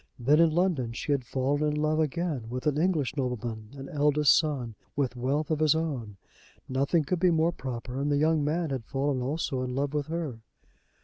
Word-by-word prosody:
Then 140 +5 +3
in 165 -1 +6
London 155 -8 0
she 130 - -3
had 140 -3 +1
fallen 135 +4 -1
in 150 -1 +1
love 155 +1 +1
again 155 -5 -1
with 125 +2 -5
an 150 -1 +1
English 155 -6 +1
nobleman, 120 -5 -3
an 135 0 -7
eldest 150 0 +4
son, 140 -7 0 0.2
with 135 -3 0
wealth 140 +6 -1
of 155 - +1
his 155 -1 +4
own. 130 -11 -3 0.5
Nothing 140 +5 +1
could 170 +5 -1
be 180 +1 +4
more 165 0 +3
proper, 130 -3 -5
and 145 +1 0
the 145 - +3
young 155 0 +3
man 160 +1 0
had 130 -4 -2
fallen 135 +1 -1
also 135 0 -2
in 125 0 -3
love 140 +1 -1
with 145 -2 -1
her. 160 -8 -4
145 Hz, 200 wpm, -28 LUFS, 130-155 Hz, 0.5 s, in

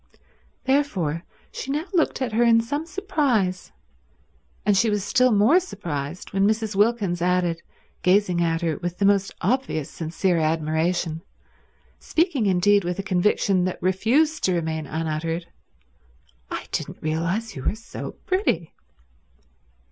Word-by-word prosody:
Therefore 195 - 0 0.3
she - - -6
now 300 +4 -1
looked 320 -6 +1
at 245 - -2
her 225 +2 +1
in 230 -1 +5
some 290 +8 -3
surprise; 285 - 0 0.9
and 205 - +4
she 220 +4 +3
was 205 -2 0
still 255 +3 +3
more 220 - +5
surprised 170 - -6
when 195 +1 +3
Mrs. 220 -1 0
Wilkins 205 -4 +1
added, 175 -1 +1 0.4
gazing 180 -1 +3
at 165 -1 +1
her 165 -4 -1
with 175 0 -4
the 200 - +1
most 195 -1 +3
obvious 225 - -1
sincere 170 +2 0
admiration, 160 +1 0 0.8
speaking 315 - +1
indeed 195 +2 +4
with 175 0 -2
a 195 - -3
conviction 190 0 +2
that 185 - -2
refused 250 - +2
to 185 - +2
remain 160 -2 -2
unuttered, 165 +2 -2 1.0
"I - - -4
didn't - - -3
realize 170 +8 -1
you 135 - -6
were 205 - -1
so 230 +1 -8
pretty." 370 - 0
190 Hz, 135 wpm, -24 LUFS, 170-230 Hz, 1.0 s, in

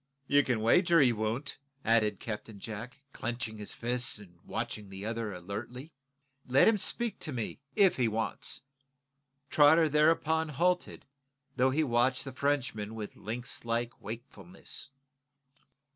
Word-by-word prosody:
"You 145 +1 +5
can 125 -5 0
wager 170 - +5
he 130 -4 +5
won't," 115 +7 -2 0.3
added 110 -3 +3
Captain 110 -1 -6
Jack, 115 +7 -7
clenching 120 -3 -3
his 105 - -7
fists 120 0 -1
and 90 -5 -15
watching 110 -3 -4
the 95 +1 -7
other 115 -1 -2
alertly. 110 - -7 0.6
"Let 130 +2 +5
him 225 -2 +4
speak 235 +2 0
to 155 - -3
me, 120 -5 -4 0.2
if 200 -4 +5
he 125 -3 +3
wants." 110 0 -2 0.9
Trotter 160 +2 +6
thereupon 160 +1 +3
halted, 180 +4 0 0.5
though 130 +1 +4
he 150 +4 +2
watched 130 0 +2
the 135 - -6
Frenchman 130 -6 -1
with 105 -2 -6
lynx 120 +4 -5
like 115 +1 -2
wakefulness. 140 - -8
120 Hz, 135 wpm, -31 LUFS, 110-145 Hz, 0.9 s, Trotter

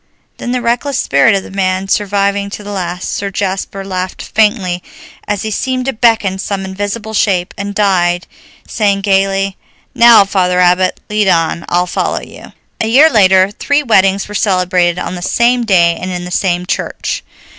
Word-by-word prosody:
Then, 245 - -5
the 250 -1 -2
reckless 245 +3 -1
spirit 140 - +3
of 195 - -2
the - - -11
man 190 0 -1
surviving 200 0 0
to 210 - -8
the 205 - -7
last, 180 -2 -4
Sir 200 - -3
Jasper 195 0 -4
laughed 185 -1 -4
faintly, 205 -5 0 0.5
as 205 -1 -2
he 220 - -3
seemed 255 +4 -2
to 270 - -1
beckon 220 -4 +1
some 195 0 -3
invisible 205 +3 -5
shape, 190 -4 0
and 200 0 -5
died 175 -4 +1 0.4
saying 200 -3 0
gaily, 195 0 0 0.4
"Now, 235 -3 +7
Father 180 -2 0
Abbot, 180 +1 +2
lead 210 -1 0
on, 170 -1 +1
I'll 175 +1 +1
follow 175 - -2
you." - - -13 0.3
A 220 - -1
year 285 +8 +5
later 190 -2 +4
three 285 +7 0
weddings 195 -5 +2
were 210 - -9
celebrated 180 -3 +1
on 180 - -4
the 175 - -6
same 235 +5 +1
day 170 -5 +3
and 185 - -4
in 180 -1 -4
the 180 - -8
same 180 -1 0
church. - - -3
195 Hz, 175 wpm, -14 LUFS, 185-210 Hz, 0.5 s, Now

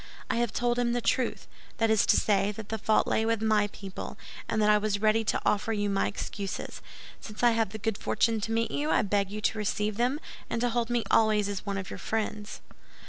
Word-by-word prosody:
I - - 0
have 235 -2 +1
told 240 0 0
him 240 -1 +1
the 245 - +1
truth; 245 +1 0 0.3
that 225 -1 +2
is 220 - +3
to - - +5
say, 200 -1 +2
that 210 0 -9
the 220 - -3
fault 215 +2 +3
lay 220 - +1
with 225 0 +1
my 215 -1 +2
people, 195 -2 -8 0.3
and 220 - 0
that 210 0 +3
I 210 - +5
was 205 -1 -1
ready 215 +1 +3
to - - 0
offer 210 +2 +1
you 205 -1 0
my 195 - +1
excuses. 200 -1 -5 0.4
Since 210 +2 -8
I 240 - +6
have 225 -3 +1
the 220 - -6
good 220 -1 -2
fortune 225 -2 +1
to 225 - -3
meet 230 0 0
you, 295 +2 -1
I - - +3
beg 200 -1 0
you 210 +1 -5
to 215 - 0
receive 210 0 -1
them, 250 +5 +1 0.3
and - - -1
to 245 - +2
hold 235 0 -1
me 240 -1 +1
always 215 -2 +4
as 200 0 -5
one 200 -1 -1
of 190 -1 -5
your - - -6
friends." 215 -1 -3
215 Hz, 240 wpm, -28 LUFS, 205-230 Hz, 0.4 s, I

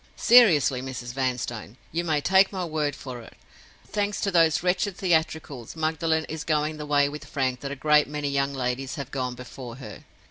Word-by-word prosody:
Seriously, 165 - +5
Mrs. 125 -2 -6
Vanstone, 125 -3 -3
you 170 +2 -1
may 155 -3 0
take 190 +4 +4
my 185 -3 -3
word 155 -3 -1
for 125 -3 -8
it—thanks 205 - -6
to 200 - 0
those 165 -2 +3
wretched 180 +1 0
theatricals, 160 - -1
Magdalen 160 0 0
is 160 -1 -6
going 155 0 0
the 150 -1 -7
way 145 -1 +3
with 150 +1 -7
Frank 130 -3 -1
that 140 - -5
a - - -4
great 150 +2 +3
many 150 0 -3
young 140 0 0
ladies 130 +2 -2
have 140 -3 -6
gone 125 -2 -3
before 125 -1 -9
her. 110 -6 -10
150 Hz, 180 wpm, -25 LUFS, 130-160 Hz, -, Seriously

